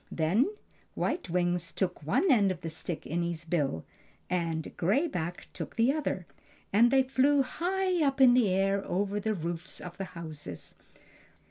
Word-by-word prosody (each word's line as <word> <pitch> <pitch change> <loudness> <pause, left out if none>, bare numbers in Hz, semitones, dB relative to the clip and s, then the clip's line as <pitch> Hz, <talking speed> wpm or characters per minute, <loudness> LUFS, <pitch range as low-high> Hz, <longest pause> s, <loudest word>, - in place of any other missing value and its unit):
Then 180 - +2 0.5
White 350 - -2
Wings 175 -1 0
took 180 -4 -2
one 160 - +2
end 205 -6 +5
of 180 -2 -6
the 165 -2 -4
stick 160 +1 -5
in 170 +3 -1
his 170 -1 -3
bill 145 - -1 0.5
and 165 -3 -2
Gray 215 - +2
Back 175 - -4
took - - -6
the 235 +4 +3
other, 285 - -2 0.5
and 230 +4 +6
they 265 +1 +4
flew 270 +2 +3
high 365 +4 0
up 275 -1 +1
in 255 -2 +8
the 245 -5 +4
air 195 +1 +1
over 200 +3 -1
the 215 +1 -1
roofs 170 0 -5
of 175 0 -9
the 195 - -3
houses. 150 - -7
190 Hz, 165 wpm, -30 LUFS, 170-260 Hz, 0.5 s, in